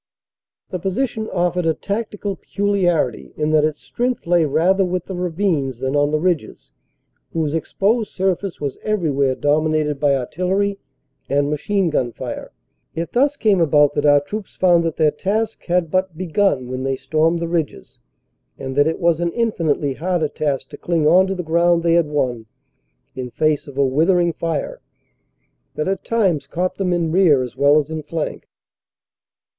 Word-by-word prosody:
The 185 - -3
position 220 +4 -2
offered 175 -1 0
a 160 - +2
tactical 205 -1 -4
peculiarity 175 - -1
in 150 0 0
that 155 -1 +4
its 155 -1 0
strength 250 +1 -3
lay 170 -1 +3
rather 180 +7 +2
with 180 -1 -2
the 190 - -6
ravines 170 - -1
than 130 +3 -2
on 145 0 +3
the 155 - +1
ridges, 175 -1 -2 0.6
whose 155 -3 -1
exposed 205 +7 0
surface 190 -1 -1
was 140 -3 -4
everywhere 145 -11 0
dominated 150 0 +1
by 140 -1 +3
artillery 190 +9 -1 0.5
and 145 +1 +1
machine 180 +4 0
gun 125 -5 0
fire. - - -6 0.4
It 165 +1 -3
thus 280 +4 +2
came 205 -7 +3
about 150 -2 +4
that 145 0 +1
our 145 0 +6
troops 205 +7 -7
found 175 -2 +4
that 165 - -1
their 155 -2 +3
task 215 +8 -2
had 175 -2 0
but 185 -3 0
begun 175 -6 0
when 130 +1 -4
they 135 0 -1
stormed 160 +5 +1
the 170 0 -3
ridges, 165 -3 -3 0.6
and 130 0 -6
that 145 +1 +5
it 160 - -1
was 170 -1 +2
an 170 0 0
infinitely 165 - 0
harder 165 +1 -1
task 140 -3 -2
to - - -10
cling 165 -3 0
on 180 +5 +5
to 195 - -2
the 180 - -4
ground 170 +1 +2
they 170 -1 +3
had 170 -2 +3
won 125 -6 -2 0.7
in 130 -1 -5
face 155 +4 0
of 140 -1 -11
a 140 - +3
withering 170 +5 +2
fire 165 -2 -3 0.9
that 155 - -2
at 195 0 -2
times 195 -10 0
caught 180 +2 -2
them 190 -2 0
in 170 -2 0
rear 160 -7 +4
as 125 -2 -7
well 140 +2 +4
as 150 +1 -4
in 160 -1 -3
flank. 155 +1 -5
165 Hz, 170 wpm, -20 LUFS, 145-185 Hz, 0.9 s, our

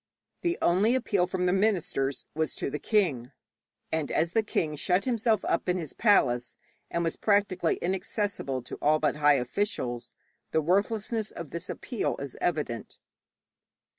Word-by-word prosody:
The 345 0 0
only 200 +8 +4
appeal 200 -8 +1
from 180 0 -1
the 180 - +3
ministers 175 - 0
was 160 0 -1
to - - -3
the 150 - -3
king, 145 - +1 0.6
and 160 -2 -1
as 165 +2 +1
the 225 - +3
king 155 -7 -1
shut 180 +6 +1
himself 225 -4 +1
up 170 - 0
in 180 - +2
his 160 -6 -5
palace, 125 - +2 0.3
and 170 - -1
was 165 - -1
practically 200 -5 +2
inaccessible 185 - -2
to - - -7
all 155 +1 +4
but 150 -1 0
high 150 -1 +5
officials, 125 - -2 0.3
the - - +2
worthlessness 210 +5 0
of 170 -4 -8
this 170 - -4
appeal 240 -6 -2
is 140 -2 -6
evident. 150 -9 -2
175 Hz, 155 wpm, -28 LUFS, 150-205 Hz, 0.6 s, high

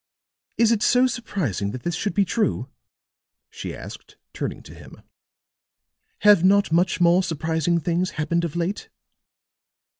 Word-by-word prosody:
"Is 230 -1 +4
it 225 -3 +1
so 250 +3 +4
surprising 190 - -2
that 125 - -7
this 175 - -2
should 200 +5 -3
be 200 -1 +3
true?" 220 +3 -1 0.8
she - - -7
asked - - -11 0.2
turning - - -5
to - - -13
him. - - -14 1.2
"Have 205 -4 +6
not 200 -1 +4
much 175 +1 +2
more 175 +1 +4
surprising 165 0 -1
things 175 +3 -1
happened 170 +2 0
of 170 -2 -4
late?" 175 +4 -3
175 Hz, 140 wpm, -23 LUFS, 165-205 Hz, 1.2 s, Have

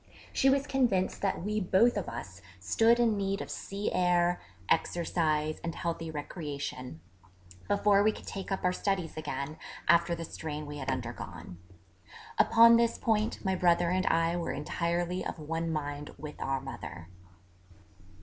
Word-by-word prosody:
She 270 - +4
was 275 +1 +2
convinced 245 -10 +1
that 195 -3 -1
we 210 +2 0
both 205 +5 +4
of 205 - -2
us 100 -5 -8 0.2
stood 225 - +3
in 230 -3 +3
need 195 0 -1
of - - -6
sea 200 +1 -3
air, 175 -1 +2 0.3
exercise 155 -3 +1
and 165 -1 -3
healthy 165 -1 -3
recreation, 145 - -5 0.7
before 200 0 +4
we 215 +1 +4
could - - -11
take 195 0 -6
up 195 - -1
our 180 0 +2
studies 185 -4 -1
again, 150 -1 -4 0.3
after 170 0 +4
the 165 0 -5
strain 150 -1 -5
we 145 0 -7
had 130 - -4
undergone. 90 -8 -5 0.8
Upon 230 0 +7
this 235 0 +2
point 220 -1 0
my 190 - +2
brother 175 -1 +3
and 185 +1 +1
I 165 +1 +2
were 170 - -2
entirely 170 +4 -1
of - - -4
one 165 +2 -3
mind 145 -1 -4
with 150 +1 -8
our 135 0 0
mother. 90 - -8
170 Hz, 155 wpm, -30 LUFS, 150-195 Hz, 0.8 s, Upon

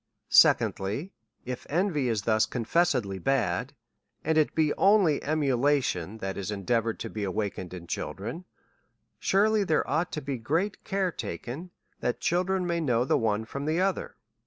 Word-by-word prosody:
Secondly, 120 - +3 0.3
If 125 -1 -6
envy 155 -5 +1
is 110 -4 -1
thus 110 -1 +2
confessedly 120 - 0
bad, 105 -5 0 0.5
and 160 +1 +1
it 155 -1 +2
be 155 -2 +2
only 195 -7 +4
emulation 135 - +1
that 95 -3 -4
is 100 - -4
endeavoured 110 +3 -1
to - - -4
be 105 - -4
awakened 95 -2 -3
in 90 -2 -8
children, 115 - -5 0.7
surely 210 +2 +3
there 160 -5 +1
ought 160 +5 0
to 155 - -2
be 135 -2 -3
great 165 - -1
care 195 -3 0
taken, 160 +3 -6 0.3
that 120 - -1
children 185 +2 +1
may 170 -1 0
know 125 -5 +2
the - - +2
one 110 -1 0
from 140 +5 -5
the 160 +3 +1
other. 190 0 -1
135 Hz, 155 wpm, -28 LUFS, 110-170 Hz, 0.7 s, only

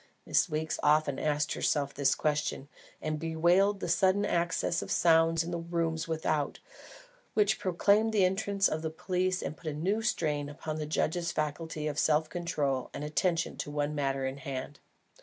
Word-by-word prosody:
Miss - - +2
Weeks 155 0 -2
often 150 -2 +3
asked 150 0 0
herself 140 -2 0
this 135 -1 +2
question, 150 -2 -1 0.4
and 155 0 -2
bewailed 175 +5 +2
the - - -2
sudden 190 +4 +3
access 170 -2 0
of - - -7
sounds 165 -1 +4
in 170 - -5
the 170 - -2
rooms 165 -1 -2
without, 155 -2 -1 0.8
which 210 0 +3
proclaimed 200 +4 +2
the 205 -4 +4
entrance 195 +1 +1
of 155 - -2
the 160 - -2
police 185 +3 -1
and 155 - -4
put 165 - -11
a - - -4
new 190 +9 0
strain 150 -10 -1
upon 155 +1 -5
the 155 -1 -4
judge's 170 +2 0
faculty 155 +1 -3
of 145 -1 -2
self 155 0 +2
control 150 -7 -1
and - - -5
attention 165 +3 0
to - - -3
the 145 - -8
one 145 0 0
matter 135 -2 -1
in 130 +1 -3
hand. 135 +1 -6
160 Hz, 175 wpm, -30 LUFS, 150-175 Hz, 0.8 s, sounds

